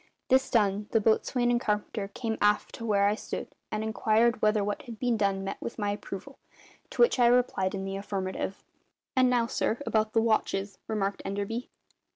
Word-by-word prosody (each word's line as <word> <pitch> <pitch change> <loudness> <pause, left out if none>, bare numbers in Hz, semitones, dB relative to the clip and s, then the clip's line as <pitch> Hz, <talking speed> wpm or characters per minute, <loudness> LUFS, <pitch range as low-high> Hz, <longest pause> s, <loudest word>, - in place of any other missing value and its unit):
This 265 +1 +4
done, 205 -3 +2
the 225 - +3
boatswain 240 +3 +2
and 240 0 +2
carpenter 210 -1 -1
came 225 +1 -3
aft 210 0 +2
to 230 - -6
where 200 -2 +3
I 205 - +3
stood 215 - -6 0.2
and 215 0 -2
inquired 220 +1 +2
whether 210 -1 +3
what 205 0 -2
had 235 -4 -9
been 245 0 +1
done 200 -2 0
met 195 - -5
with - - -5
my 205 -2 0
approval; 205 +6 -7 0.5
to - - +3
which 475 - +3
I 240 - +6
replied 240 -6 +2
in 190 0 -4
the 195 0 -3
affirmative. 195 -1 -4 0.5
"And 255 -1 +5
now, 245 -2 +3
sir, 230 -1 -1
about 215 0 +1
the 225 - +4
watches," 200 -3 0
remarked 200 -2 -1
Enderby. 205 +5 -3
215 Hz, 190 wpm, -28 LUFS, 200-235 Hz, 0.5 s, I